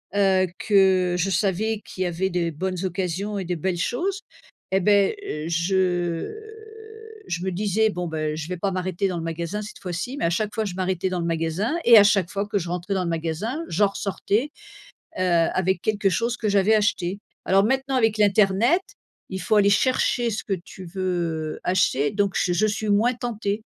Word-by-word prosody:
heu, 190 Hz, -2 st, +3 dB
que 190 Hz, -3 st, +3 dB
je 180 Hz, +2 st, 0 dB
savais 210 Hz, +3 st, 0 dB
qu'il 185 Hz, -, -4 dB
y -, -, -1 dB
avait 175 Hz, +2 st, -1 dB
des 175 Hz, -2 st, -1 dB
bonnes 185 Hz, +3 st, -3 dB
occasions 190 Hz, +3 st, -2 dB
et 190 Hz, -, -4 dB
des 180 Hz, +1 st, -2 dB
belles 175 Hz, +2 st, -2 dB
choses 375 Hz, -, -1 dB, 0.5 s
et 190 Hz, 0 st, +2 dB
beh, 200 Hz, -, +3 dB, 0.3 s
je 175 Hz, -, 0 dB, 0.9 s
je 175 Hz, 0 st, -3 dB
me 190 Hz, -, -1 dB
disais: 210 Hz, +3 st, +1 dB
«Bon, 180 Hz, -3 st, -4 dB
beh, 155 Hz, -1 st, -2 dB
je 160 Hz, 0 st, -5 dB
vais 180 Hz, -, -3 dB
pas 195 Hz, +3 st, -1 dB
m'arrêter 185 Hz, +1 st, -1 dB
dans 180 Hz, -2 st, -3 dB
le 165 Hz, -, -4 dB
magasin 170 Hz, +5 st, -3 dB
cette 210 Hz, -, -9 dB
fois-ci». 180 Hz, +8 st, -4 dB
Mais -, -, -1 dB
à -, -, +3 dB
chaque 210 Hz, +4 st, -1 dB
fois, 220 Hz, -, -1 dB
je 185 Hz, -4 st, -5 dB
m'arrêtais 185 Hz, 0 st, -1 dB
dans 180 Hz, -1 st, -2 dB
le -, -, -2 dB
magasin 165 Hz, -, -1 dB
et 235 Hz, -1 st, +9 dB
à 205 Hz, -, +9 dB
chaque 200 Hz, -4 st, +3 dB
fois 200 Hz, +1 st, -2 dB
que 205 Hz, -, -1 dB
je 175 Hz, -3 st, -3 dB
rentrais 180 Hz, +3 st, -3 dB
dans 190 Hz, -1 st, 0 dB
le -, -, -2 dB
magasin, 170 Hz, -, -2 dB
j'en 200 Hz, +5 st, +3 dB
ressortais, 205 Hz, +7 st, -2 dB, 0.7 s
heu, -, -, 0 dB
avec 180 Hz, +1 st, +1 dB
quelque 205 Hz, -1 st, +1 dB
chose 235 Hz, +6 st, -1 dB
que 220 Hz, -, -2 dB
j'avais 200 Hz, +2 st, +3 dB
acheté. 200 Hz, -3 st, 0 dB, 0.3 s
Alors 195 Hz, +1 st, +4 dB
maintenant, 265 Hz, +3 st, 0 dB
avec 225 Hz, -4 st, +2 dB
l'internet, 210 Hz, -, +3 dB, 0.5 s
il 190 Hz, -1 st, -4 dB
faut 215 Hz, -, +1 dB
aller 200 Hz, -1 st, +5 dB
chercher 240 Hz, +2 st, +2 dB
ce 220 Hz, 0 st, -3 dB
que 200 Hz, -, -2 dB
tu 185 Hz, 0 st, -8 dB
veux 170 Hz, -4 st, -3 dB
acheter, 180 Hz, -6 st, +1 dB
donc 200 Hz, -1 st, 0 dB
je 180 Hz, -, +1 dB
je 215 Hz, +5 st, +2 dB
suis 215 Hz, 0 st, -2 dB
moins 215 Hz, +5 st, +3 dB
tentée. 220 Hz, -3 st, -3 dB
190 Hz, 195 wpm, -24 LUFS, 175-210 Hz, 0.9 s, et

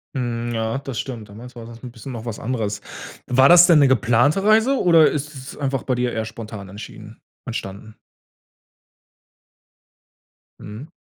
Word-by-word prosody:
Hm. 120 Hz, -2 st, -3 dB
Ja, 110 Hz, +2 st, -2 dB
das 135 Hz, -4 st, -6 dB
stimmt. 115 Hz, -6 st, -7 dB
Damals 120 Hz, +5 st, -12 dB
war 115 Hz, -1 st, -9 dB
das 115 Hz, 0 st, -12 dB
'n 125 Hz, -, -8 dB
bisschen 115 Hz, +3 st, -10 dB
noch 115 Hz, -2 st, -7 dB
was 115 Hz, -3 st, -5 dB
anderes. 110 Hz, -4 st, -3 dB, 0.5 s
War 130 Hz, +2 st, +4 dB
das 175 Hz, 0 st, +9 dB
denn 165 Hz, -4 st, +6 dB
'ne 140 Hz, -, +5 dB
geplante 125 Hz, +7 st, +2 dB
Reise 220 Hz, +5 st, +4 dB
oder 165 Hz, -3 st, +5 dB
ist 150 Hz, +1 st, -4 dB
es 135 Hz, -1 st, -10 dB
einfach 135 Hz, -3 st, -2 dB
bei 130 Hz, -, -1 dB
dir 125 Hz, 0 st, -1 dB
eher 110 Hz, 0 st, -2 dB
spontan 110 Hz, -3 st, -9 dB
entschieden 105 Hz, +2 st, -11 dB, 0.3 s
entstanden? 110 Hz, -1 st, -7 dB, 2.6 s
Mhm. 110 Hz, +9 st, -9 dB
120 Hz, 160 wpm, -21 LUFS, 110-135 Hz, 2.6 s, das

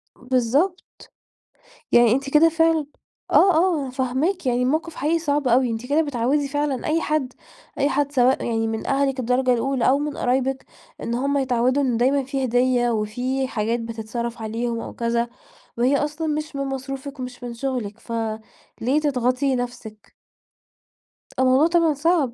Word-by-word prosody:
بالضبط. 260 Hz, +9 st, 0 dB, 1.1 s
يعني 240 Hz, -2 st, +6 dB
أنتِ 275 Hz, +2 st, -1 dB
كده 310 Hz, +3 st, +6 dB
فعلًا 325 Hz, -2 st, +2 dB, 0.4 s
آه، 380 Hz, -2 st, +5 dB
آه، 335 Hz, -1 st, +2 dB
أنا 265 Hz, -, -5 dB
فاهماكِ، 265 Hz, +7 st, -1 dB
يعني 245 Hz, 0 st, +1 dB
المَوْقف 315 Hz, +5 st, -1 dB
حقيقي 320 Hz, +3 st, +1 dB
صعب 290 Hz, -4 st, 0 dB
أوي. 245 Hz, +1 st, +3 dB
أنتِ 225 Hz, +2 st, -4 dB
كده 290 Hz, +4 st, +2 dB
بتعوّدي 280 Hz, 0 st, 0 dB
فعلًا 290 Hz, -3 st, -2 dB
أي 320 Hz, +2 st, +1 dB
حد، 300 Hz, -5 st, -1 dB, 0.5 s
أي 280 Hz, -, +2 dB
حد 285 Hz, 0 st, 0 dB
سواء 255 Hz, -1 st, +3 dB
يعني 225 Hz, -1 st, 0 dB
من 220 Hz, 0 st, -4 dB
أهلِك 275 Hz, -1 st, +1 dB
الدرجة 250 Hz, +1 st, +2 dB
الأُولى 250 Hz, +1 st, +1 dB
أو 270 Hz, +2 st, +4 dB
من 295 Hz, 0 st, -3 dB
قرايبِك 260 Hz, +1 st, 0 dB, 0.4 s
إن 235 Hz, -, -2 dB
هُم 280 Hz, +3 st, 0 dB
يتعوّدوا 255 Hz, +1 st, +1 dB
إن 250 Hz, -4 st, +1 dB
دايمًا 265 Hz, +4 st, +2 dB
في 270 Hz, 0 st, -2 dB
هدية 245 Hz, 0 st, +2 dB
وفي 245 Hz, +5 st, -1 dB
حاجات 230 Hz, 0 st, -1 dB
بتتصرف 230 Hz, +1 st, -5 dB
عليهم 230 Hz, +1 st, -2 dB
أو -, -, -7 dB
كذا، 235 Hz, 0 st, -1 dB, 0.5 s
وهي 255 Hz, +4 st, +3 dB
أصلًا 300 Hz, +3 st, -2 dB
مش 305 Hz, -1 st, -3 dB
من 275 Hz, -, -1 dB
مصروفِك 270 Hz, +1 st, -6 dB
ومش 250 Hz, 0 st, -7 dB
من 240 Hz, -1 st, -5 dB
شغلِك، 235 Hz, -4 st, -4 dB
فليه 230 Hz, +4 st, -3 dB
تضغطي 260 Hz, -1 st, +1 dB
نَفْسِك؟ 240 Hz, -4 st, -7 dB, 1.3 s
الموضوع 260 Hz, +4 st, +4 dB
طبعًا 335 Hz, -2 st, +3 dB
صعب. 295 Hz, -3 st, +1 dB
260 Hz, 155 wpm, -22 LUFS, 240-290 Hz, 1.3 s, يعني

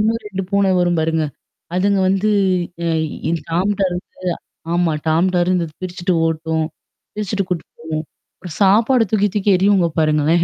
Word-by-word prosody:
இன்னும் 225 Hz, +2 st, +1 dB
2 195 Hz, -1 st, -4 dB
பூன 200 Hz, -1 st, +3 dB
வரும் 175 Hz, -1 st, +2 dB
பாருங்க. 160 Hz, 0 st, +1 dB, 0.5 s
அதுங்க 195 Hz, +2 st, +2 dB
வந்து 195 Hz, +3 st, +2 dB, 0.6 s
அ -, -, +1 dB, 0.6 s
டாம்டர்ந்து 185 Hz, +1 st, 0 dB, 0.7 s
ஆமா. 175 Hz, -1 st, +2 dB, 0.2 s
டாம்டர்ந்து 175 Hz, +2 st, +2 dB
பிரிச்சுட்டு 180 Hz, 0 st, -2 dB
ஓட்டும். 160 Hz, 0 st, -1 dB, 0.5 s
பிரிச்சுட்டு 205 Hz, -1 st, -2 dB
கூட்டு 175 Hz, -4 st, -2 dB
போவும். 155 Hz, 0 st, -4 dB, 0.4 s
ஒரு 180 Hz, -4 st, -8 dB
சாப்பாடு 225 Hz, +5 st, +5 dB
தூக்கி 205 Hz, -1 st, +3 dB
தூக்கி 205 Hz, 0 st, 0 dB
எரியுங்க 190 Hz, -2 st, +3 dB
பாருங்களேன். 155 Hz, +2 st, +3 dB
185 Hz, 125 wpm, -19 LUFS, 165-200 Hz, 0.7 s, சாப்பாடு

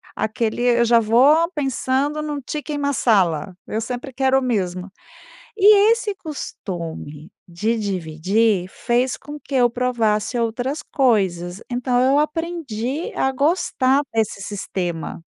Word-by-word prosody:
aquele 220 Hz, +2 st, -1 dB
eu 240 Hz, -1 st, +4 dB
já 235 Hz, 0 st, +5 dB
vou 275 Hz, +10 st, +4 dB
pensando 275 Hz, +1 st, -1 dB
num 295 Hz, -2 st, -4 dB
Chicken 295 Hz, -1 st, -3 dB
Marsala, 195 Hz, -, +1 dB
eu 220 Hz, -, -2 dB
sempre 245 Hz, +3 st, -5 dB
quero 265 Hz, +1 st, +2 dB
o -, -, -6 dB
mesmo. 190 Hz, -6 st, -2 dB, 0.6 s
E 415 Hz, +1 st, +6 dB
esse 460 Hz, -3 st, -3 dB
costume, 170 Hz, -, -7 dB, 0.2 s
de 210 Hz, +7 st, -1 dB
dividir, 190 Hz, +2 st, 0 dB
fez 245 Hz, +5 st, 0 dB
com 295 Hz, +1 st, -10 dB
que 280 Hz, -, -6 dB
eu 245 Hz, -1 st, +4 dB
provasse 235 Hz, -2 st, 0 dB
outras 245 Hz, +6 st, -2 dB
coisas. 190 Hz, -, 0 dB
Então, 245 Hz, 0 st, +1 dB
eu 270 Hz, +3 st, +4 dB
aprendi 300 Hz, -4 st, -3 dB
a 265 Hz, -, +1 dB
gostar 275 Hz, -2 st, +2 dB
desse 220 Hz, -3 st, -1 dB
sistema. 175 Hz, -5 st, -4 dB
240 Hz, 125 wpm, -21 LUFS, 205-280 Hz, 0.6 s, E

